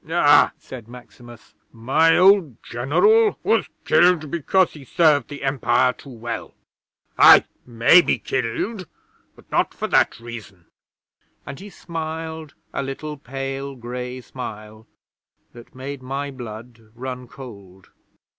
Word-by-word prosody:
'"Ah!" 145 -3 +5
said 120 -4 -11
Maximus. 120 -1 -15 0.2
"My 135 +8 +2
old 185 - +4
General 420 - +2
was - - +1 0.2
killed 175 -4 +3
because 175 +3 +1
he 150 - -12
served 150 +1 +2
the 145 -1 -9
Empire 130 -2 +1
too 140 - -15
well. 120 -2 -7 0.6
I - - +8 0.2
may 120 +9 +5
be - - 0
killed, 145 - -3 0.5
but - - -21
not - - 0
for - - -3
that - - +2
reason," 110 -7 -11 0.8
and 140 +1 -8
he 200 +2 -10
smiled 160 -3 -7 0.2
a - - -2
little 140 +3 -6
pale 135 0 -6
grey 125 +1 -6
smile 110 -3 -9 0.7
that 120 +1 -15
made 135 +1 -7
my 135 +2 -4
blood 120 -2 -10
run 125 0 -7
cold. 100 -8 -13
135 Hz, 125 wpm, -22 LUFS, 120-155 Hz, 0.8 s, I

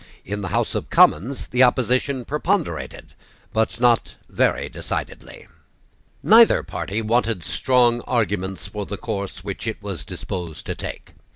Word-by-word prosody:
In 105 +2 -4
the 95 - -3
House 90 - 0
of - - -3
Commons 120 - +3
the 125 - 0
opposition 130 +1 +2
preponderated, 165 +4 -2 0.4
but 110 +1 0
not 120 -2 +2
very - - +1
decidedly. - - -6 0.8
Neither 225 +2 +6
party 95 +5 -4
wanted 115 -4 +1
strong 120 - +2
arguments 95 -6 -1
for 105 0 -5
the 100 - -5
course 100 -3 -5
which 100 +3 -5
it 110 - -2
was 100 -4 -6
disposed 85 -4 -6
to - - -3
take. - - -8
110 Hz, 135 wpm, -22 LUFS, 95-125 Hz, 0.8 s, Neither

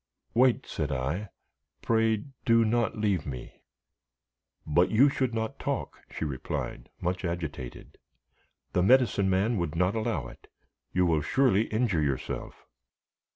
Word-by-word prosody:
"Wait," 125 0 +3
said 75 -2 -3
I; 75 +10 -2 0.5
"pray 110 -2 +2 0.2
do 115 -1 +4
not 115 0 +1
leave 100 -7 +1
me." 65 -3 -8 1.0
"But 85 +4 +3
you 130 +6 +5
should 130 -2 0
not 110 -1 -3
talk," - - -3
she - - -4
replied, 70 -4 -4
much 90 +1 -2
agitated; 80 -8 -5 0.7
"the 90 - +3
Medicine 110 -2 +4
Man 100 +5 +2
would 85 -2 -2
not 90 +3 +2
allow 110 -1 -1
it; - - -14 0.4
you 90 0 +2
will 80 -3 +2
surely 115 - +3
injure 110 -7 +1
yourself." 70 -3 -3
95 Hz, 130 wpm, -28 LUFS, 80-115 Hz, 1.0 s, you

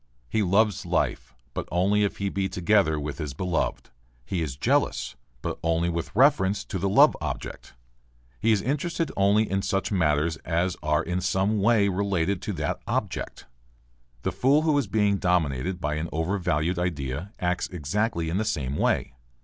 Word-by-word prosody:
He 110 - 0
loves 100 +1 +2
life - - -1 0.2
but - - -4
only 100 +4 +2
if 100 - -1
he 100 0 -1
be 95 0 -1
together 90 -3 +2
with 75 +1 -5
his 75 -5 -4
beloved; 90 +1 -2 0.3
he 85 +6 -2
is 70 -5 -3
jealous, 70 - 0 0.3
but - - -3
only 85 +1 +1
with 85 +3 -4
reference 105 -7 +3
to 95 - -4
the 100 +2 0
love - - +6
object; - - -6 0.6
he 115 - +2
is 105 -3 +2
interested 160 +4 -1
only 100 +2 +3
in 95 0 0
such 95 +1 -1
matters 80 -3 +1
as 85 +3 -1
are 75 +1 +1
in 90 +2 -2
some 95 +3 +1
way 105 -1 +4
related 100 -2 0
to - - -3
that - - -2
object. - - -3 0.8
The - - 0
fool 140 +4 +3
who 155 -2 +2
is 130 - -2
being 100 0 +2
dominated 90 -2 0
by 75 -2 -1
an 80 +2 -3
overvalued 85 0 0
idea 85 0 -3
acts 90 0 0
exactly 90 +2 -1
in 85 +3 -1
the 110 - +1
same 70 -8 -2
way. - - +1
90 Hz, 170 wpm, -26 LUFS, 80-100 Hz, 0.8 s, love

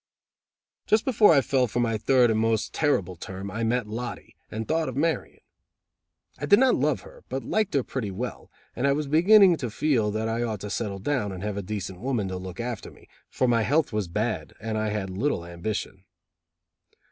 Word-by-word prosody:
Just 215 +1 +3
before 220 -7 +5
I 145 -4 +6
fell 130 -1 +1
for 120 - -2
my 115 -2 +1
third 125 +2 +3
and 110 - +1
most 110 -1 0
terrible 100 - +1
term, 95 +3 -7
I 115 +1 -3
met 120 +1 +1
Lottie, 115 +3 -6
and 110 +1 -5
thought 160 -2 0
of 130 - -6
marrying. 160 +2 -1 1.0
I 145 - -3
did 205 - +7
not 260 +1 +5
love 145 +1 +1
her, - - -15
but 130 +1 -3
liked 215 -5 0
her 135 - +3
pretty 120 -6 -4
well, 115 +6 -6 0.3
and 130 +4 +1
I 140 - +4
was 150 +1 -1
beginning 175 +5 +6
to 125 -4 -3
feel 115 -2 +1
that 110 +1 -2
I 115 +1 -1
ought 110 -4 -2
to 105 - -5
settle 105 -4 -2
down 105 0 -1
and 95 0 -7
have 105 -1 -2
a 100 - -2
decent 95 -2 -5
woman 120 -5 -1
to 95 - -4
look 90 0 -8
after 120 -2 -4
me, - - -19 0.2
for 130 - 0
my 115 -1 +3
health 145 +3 +1
was 105 -3 -1
bad 85 - -2
and 110 0 -3
I 110 0 0
had 105 -3 -3
little 95 -2 -1
ambition. 95 +2 -5
115 Hz, 205 wpm, -26 LUFS, 105-140 Hz, 1.0 s, did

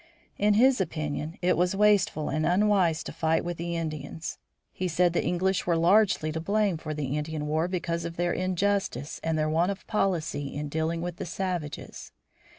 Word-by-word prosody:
In 210 0 +4
his 255 0 +5
opinion 155 -2 -3
it 180 - +3
was 180 +2 +1
wasteful 200 -6 +3
and 155 - 0
unwise 185 -3 +3
to - - -7
fight 160 +1 +1
with 175 -1 -3
the 170 0 -3
Indians. 160 -1 -5 0.3
He 185 - -2
said 175 +1 +2
the - - +1
English 185 +1 0
were 170 -2 +3
largely 175 -2 +3
to 160 - -3
blame 200 +1 +1
for 155 -1 -5
the 145 -2 -2
Indian 150 0 -3
war 155 +3 0
because 170 -2 -2
of 170 0 -5
their 175 0 0
injustice 185 -3 -1
and 160 -1 0
their 155 0 +1
want 165 +4 +2
of 195 - -7
policy 165 -9 -1
in 145 0 -3
dealing 160 +2 -1
with 175 -1 -4
the - - -5
savages. 180 -6 -4
170 Hz, 185 wpm, -27 LUFS, 155-185 Hz, 0.3 s, his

